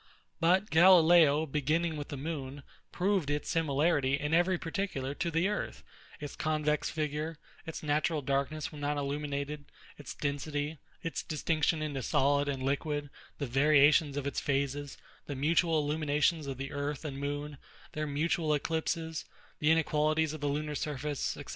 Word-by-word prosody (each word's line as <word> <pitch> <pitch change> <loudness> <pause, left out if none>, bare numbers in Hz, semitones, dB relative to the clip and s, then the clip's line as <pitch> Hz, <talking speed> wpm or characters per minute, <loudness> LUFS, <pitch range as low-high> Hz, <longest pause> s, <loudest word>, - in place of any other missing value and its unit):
But 185 +5 +3
GALILEO, 165 -3 +6
beginning 155 +3 0
with 145 -1 -5
the 145 - -6
moon, 140 -2 -5 0.3
proved 185 -5 0
its 145 0 -1
similarity 145 -3 +2
in 150 +2 -2
every 175 +2 +3
particular 165 -6 -3
to 170 +4 -2
the 165 +3 +1
earth; 210 - -3 0.4
its 145 -2 -6
convex 150 -1 0
figure, 155 +1 -3 0.3
its 160 - -6
natural 150 0 0
darkness 140 +3 -1
when 150 -2 -9
not 145 0 -1
illuminated, 145 +1 -3 0.3
its 145 - -8
density, 145 +1 -3 0.2
its 165 - -3
distinction 155 0 0
into 145 -3 -3
solid 140 +3 +2
and 135 -2 -3
liquid, 145 +1 -1 0.3
the 145 - -2
variations 145 +2 +4
of 145 - -2
its 140 - -1
phases, 140 0 -2 0.3
the 145 - -4
mutual 160 +4 +2
illuminations 150 +1 +1
of 135 -2 -4
the 135 +1 -5
earth 145 +1 -3
and 140 -2 -4
moon, 145 0 -4 0.3
their 155 0 -3
mutual 155 +1 +1
eclipses, 160 +1 -2 0.3
the 150 - +2
inequalities 155 -1 +2
of 155 - -7
the 145 - 0
lunar 150 +1 -2
surface, 145 0 -3
&c. - - -7
150 Hz, 155 wpm, -31 LUFS, 140-160 Hz, 0.4 s, GALILEO